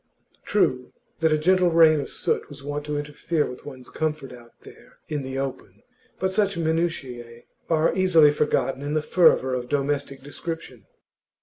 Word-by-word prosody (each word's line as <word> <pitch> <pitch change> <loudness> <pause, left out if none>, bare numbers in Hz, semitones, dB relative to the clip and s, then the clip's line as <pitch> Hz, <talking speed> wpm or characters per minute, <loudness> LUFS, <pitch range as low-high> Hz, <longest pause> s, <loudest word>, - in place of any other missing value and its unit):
True 125 0 0 0.3
that 160 -1 +2
a 155 - +3
gentle 180 +3 +3
rain 160 -2 +5
of - - -7
soot - - -2
was 140 -1 -11
wont 145 +1 -5
to 150 0 -2
interfere 150 +2 -2
with 125 +2 -9
one's 130 -3 -10
comfort 150 -4 -3
out 120 -1 -16
there - - -16
in 150 -2 -2
the 130 0 -5
open, 135 -1 -6 0.3
but 190 0 -1
such 200 -1 +1
minutiae 135 -8 -3 0.3
are 160 -1 +2
easily 170 -6 +5
forgotten 145 -2 0
in 145 +2 -3
the 155 - 0
fervour 150 -7 +3
of 125 -1 -3
domestic 140 -1 -2
description. 145 - -7
145 Hz, 165 wpm, -24 LUFS, 135-160 Hz, 0.3 s, rain